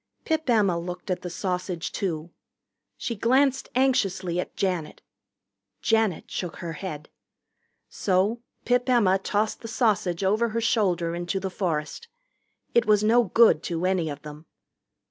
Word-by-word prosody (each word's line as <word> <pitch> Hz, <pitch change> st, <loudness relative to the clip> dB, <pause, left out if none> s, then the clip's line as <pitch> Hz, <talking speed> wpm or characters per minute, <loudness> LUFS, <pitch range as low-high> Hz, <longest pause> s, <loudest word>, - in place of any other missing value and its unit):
Pip 315 Hz, -3 st, -1 dB
Emma 200 Hz, -7 st, +3 dB
looked 180 Hz, +2 st, -6 dB
at 180 Hz, -, -1 dB
the 180 Hz, -, -5 dB
sausage, 180 Hz, -1 st, -3 dB
too. 170 Hz, -3 st, -3 dB, 0.7 s
She 235 Hz, -, -3 dB
glanced 265 Hz, +5 st, +2 dB
anxiously 195 Hz, -9 st, +1 dB
at -, -, -5 dB
Janet. 180 Hz, -5 st, -2 dB, 0.8 s
Janet 220 Hz, -6 st, +1 dB
shook 175 Hz, -3 st, -4 dB
her 170 Hz, -1 st, -6 dB
head. 155 Hz, -3 st, -7 dB, 0.8 s
So 200 Hz, +5 st, 0 dB, 0.2 s
Pip 245 Hz, +1 st, +2 dB
Emma 200 Hz, -6 st, +4 dB
tossed 210 Hz, +2 st, -1 dB
the 230 Hz, -, -7 dB
sausage 200 Hz, -7 st, 0 dB
over 215 Hz, +5 st, +2 dB
her 225 Hz, +1 st, -1 dB
shoulder 180 Hz, -8 st, +1 dB
into 175 Hz, +2 st, -2 dB
the 190 Hz, 0 st, -4 dB
forest. 175 Hz, -, -3 dB, 0.7 s
It 235 Hz, -2 st, +3 dB
was 210 Hz, -1 st, +4 dB
no 235 Hz, +2 st, +4 dB
good 215 Hz, -4 st, +5 dB
to 170 Hz, +1 st, -2 dB
any 185 Hz, -4 st, +1 dB
of 145 Hz, 0 st, -7 dB
them. 150 Hz, +1 st, -10 dB
190 Hz, 145 wpm, -26 LUFS, 175-225 Hz, 0.8 s, good